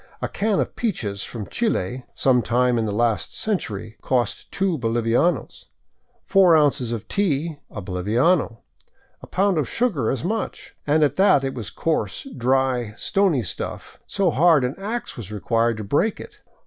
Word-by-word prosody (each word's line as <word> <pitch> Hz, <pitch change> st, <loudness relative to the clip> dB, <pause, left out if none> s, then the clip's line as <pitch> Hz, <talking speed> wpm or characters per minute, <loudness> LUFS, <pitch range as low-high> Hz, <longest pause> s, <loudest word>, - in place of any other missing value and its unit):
A -, -, -2 dB
can 210 Hz, -1 st, 0 dB
of -, -, -2 dB
peaches 105 Hz, -, -2 dB
from 110 Hz, -4 st, -6 dB
Chile 130 Hz, -, -2 dB
— -, -, -40 dB
some 125 Hz, -2 st, +5 dB
time 120 Hz, +1 st, +2 dB
in 110 Hz, -, 0 dB
the 105 Hz, -, -2 dB
last 115 Hz, +1 st, 0 dB
century 110 Hz, -, -3 dB
— -, -, -35 dB
cost 125 Hz, -4 st, -1 dB
two 190 Hz, -5 st, 0 dB
bolivianos; 115 Hz, -, 0 dB, 0.6 s
four 185 Hz, -4 st, +5 dB
ounces 140 Hz, -5 st, +2 dB
of 115 Hz, -3 st, -4 dB
tea, 160 Hz, -5 st, -1 dB
a 105 Hz, -, -7 dB
boliviano, 115 Hz, -, +1 dB, 0.6 s
a -, -, -11 dB
pound 195 Hz, -3 st, +1 dB
of 140 Hz, -, -1 dB
sugar 195 Hz, -, 0 dB
as 135 Hz, -, -2 dB
much, 215 Hz, +5 st, -3 dB
and 155 Hz, +1 st, +4 dB
at 145 Hz, -1 st, +1 dB
that 190 Hz, -8 st, +5 dB
it 135 Hz, 0 st, -2 dB
was 110 Hz, -5 st, -5 dB
a -, -, -19 dB
coarse, 165 Hz, -, -1 dB
dirty, 125 Hz, -3 st, +1 dB
stony 185 Hz, -, +1 dB
stuff, 90 Hz, -, -6 dB
so 195 Hz, -4 st, +1 dB
hard 160 Hz, -1 st, +4 dB
an 125 Hz, +1 st, -1 dB
ax 225 Hz, +5 st, -4 dB
was 110 Hz, -4 st, -8 dB
required 115 Hz, +2 st, 0 dB
to 110 Hz, -, -5 dB
break 145 Hz, -, +1 dB
it. -, -, -11 dB
130 Hz, 175 wpm, -23 LUFS, 115-175 Hz, 0.6 s, some